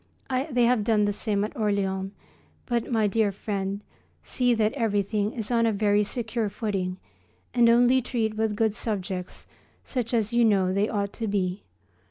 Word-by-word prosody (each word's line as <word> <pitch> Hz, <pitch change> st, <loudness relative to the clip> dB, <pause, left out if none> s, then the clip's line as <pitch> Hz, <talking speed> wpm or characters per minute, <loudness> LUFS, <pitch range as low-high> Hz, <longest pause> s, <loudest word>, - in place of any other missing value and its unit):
They 245 Hz, -3 st, +2 dB
have 235 Hz, -2 st, +3 dB
done 210 Hz, -1 st, +3 dB
the 205 Hz, -, 0 dB
same 205 Hz, 0 st, -1 dB
at 215 Hz, -, -4 dB
Orleans. 195 Hz, -4 st, -1 dB, 0.5 s
But, 240 Hz, -1 st, -1 dB
my 220 Hz, -2 st, +2 dB
dear 210 Hz, 0 st, +2 dB
friend, 200 Hz, 0 st, -3 dB, 0.4 s
see 245 Hz, -1 st, +1 dB
that 220 Hz, -1 st, +1 dB
everything 210 Hz, -4 st, 0 dB
is 225 Hz, -1 st, -4 dB
on 230 Hz, -1 st, +3 dB
a -, -, +3 dB
very 205 Hz, 0 st, +2 dB
secure 225 Hz, 0 st, -2 dB
footing 195 Hz, -3 st, -3 dB, 0.6 s
and 240 Hz, -1 st, +5 dB
only 245 Hz, +2 st, +5 dB
treat 230 Hz, -3 st, -1 dB
with 220 Hz, -1 st, 0 dB
good 220 Hz, 0 st, +1 dB
subjects, 190 Hz, -5 st, -4 dB, 0.4 s
such 245 Hz, -4 st, -3 dB
as 225 Hz, -2 st, 0 dB
you 240 Hz, 0 st, +4 dB
know 195 Hz, -4 st, +3 dB
they 200 Hz, +2 st, +1 dB
ought 200 Hz, -2 st, -2 dB
to 225 Hz, -, -4 dB
be. 190 Hz, -2 st, -1 dB
215 Hz, 170 wpm, -26 LUFS, 200-230 Hz, 0.6 s, and